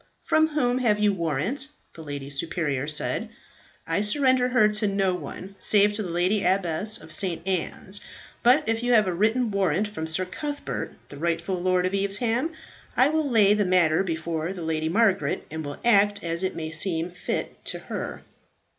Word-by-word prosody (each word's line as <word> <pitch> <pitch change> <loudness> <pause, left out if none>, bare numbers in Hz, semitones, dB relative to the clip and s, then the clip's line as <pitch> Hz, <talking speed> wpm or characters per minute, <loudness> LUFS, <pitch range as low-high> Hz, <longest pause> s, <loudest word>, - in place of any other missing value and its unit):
"From 315 0 +3
whom 255 -5 0
have 220 -5 +2
you 210 -1 +3
warrant?" 175 - -2 0.3
the 165 - -11
lady 145 -2 -6
superior 145 -2 -2
said. 150 -1 0 0.6
"I 165 +4 0
surrender 255 +3 +3
her 250 -4 +4
to 210 0 0
no 195 -2 +1
one, 180 +3 -7
save 205 0 +4
to 210 - -2
the 190 - -4
lady 180 +4 +1
abbess 190 +3 +1
of - - -10
St. 175 -4 -1
Anne's. 190 +2 -2 0.4
But 250 +4 +4
if 225 0 0
you 245 0 +1
have 215 -2 +5
a 185 - -1
written 220 +5 +1
warrant 200 +1 +1
from 160 -6 -5
Sir 160 +4 0
Cuthbert, 290 +10 -5
the 145 - -10
rightful 170 +3 -1
lord 185 0 +2
of 185 - -1
Evesham, 225 +9 +1 0.5
I 260 - +5
will 310 -2 0
lay 210 -4 +5
the 210 0 +2
matter 180 -4 +3
before 165 -1 -3
the 180 -3 -7
Lady 160 0 -1
Margaret, 195 -6 +1
and 160 0 -4
will 145 -1 -6
act 205 -3 +4
as 170 0 -2
it 185 0 -2
may 160 -1 -4
seem 165 +1 0
fit 180 - -4
to - - -2
her." - - -6
195 Hz, 180 wpm, -25 LUFS, 165-215 Hz, 0.6 s, have